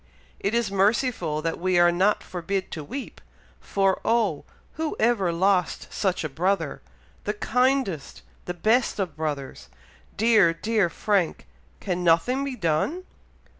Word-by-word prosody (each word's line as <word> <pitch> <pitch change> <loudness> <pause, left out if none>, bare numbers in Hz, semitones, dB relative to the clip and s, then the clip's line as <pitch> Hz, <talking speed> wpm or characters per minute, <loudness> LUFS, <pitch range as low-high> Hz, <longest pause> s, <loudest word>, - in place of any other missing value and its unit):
It 200 +3 -1
is 235 -4 0
merciful 195 - +1
that 165 - -2
we 185 0 +1
are 175 0 +6
not 190 +4 +2
forbid 185 +2 -3
to 155 - -5
weep, 265 - -7 0.4
for, 195 -1 0
oh! 220 -10 +1 0.3
who 315 0 -3
ever 215 -6 +2
lost 180 +1 0
such 190 -5 0
a - - -1
brother? 180 +7 -1 0.4
the 210 - 0
kindest 250 - 0 0.2
the 180 - -4
best 225 +7 +2
of 185 -7 -3
brothers! 145 - -5 0.5
dear, 215 -6 +5
dear 215 -1 +1
Frank! 190 - 0 0.3
can 180 -2 -2
nothing 175 +11 +3
be 275 -2 -3
done! 185 - 0
195 Hz, 135 wpm, -25 LUFS, 170-225 Hz, 0.5 s, are